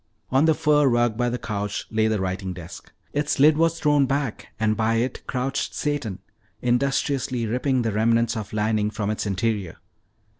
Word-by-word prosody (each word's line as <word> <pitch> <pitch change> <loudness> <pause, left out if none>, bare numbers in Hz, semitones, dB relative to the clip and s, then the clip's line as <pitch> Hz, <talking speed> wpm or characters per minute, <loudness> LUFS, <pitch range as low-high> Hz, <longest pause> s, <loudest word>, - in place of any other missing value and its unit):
On 135 +4 +4
the 160 -1 +4
fur 150 -2 +3
rug 120 -2 +2
by 120 +1 0
the 125 - -2
couch 105 -3 -3
lay 110 0 +2
the 110 -2 0
writing 95 0 -3
desk. 85 -1 -10 0.2
Its 145 -1 0
lid 150 +2 +6
was 165 +1 +1
thrown 145 -2 +3
back 140 -3 -2
and 110 -1 +2
by 110 +1 +1
it 120 +3 -1
crouched 130 +2 -2
Satan 145 -10 -2 0.4
industriously 130 0 0
ripping 125 +3 0
the 115 - 0
remnants 115 +2 +2
of 110 -3 -5
lining 105 0 +1
from 105 -1 -2
its 110 - -3
interior. 100 -2 -1
115 Hz, 175 wpm, -24 LUFS, 110-140 Hz, 0.4 s, lid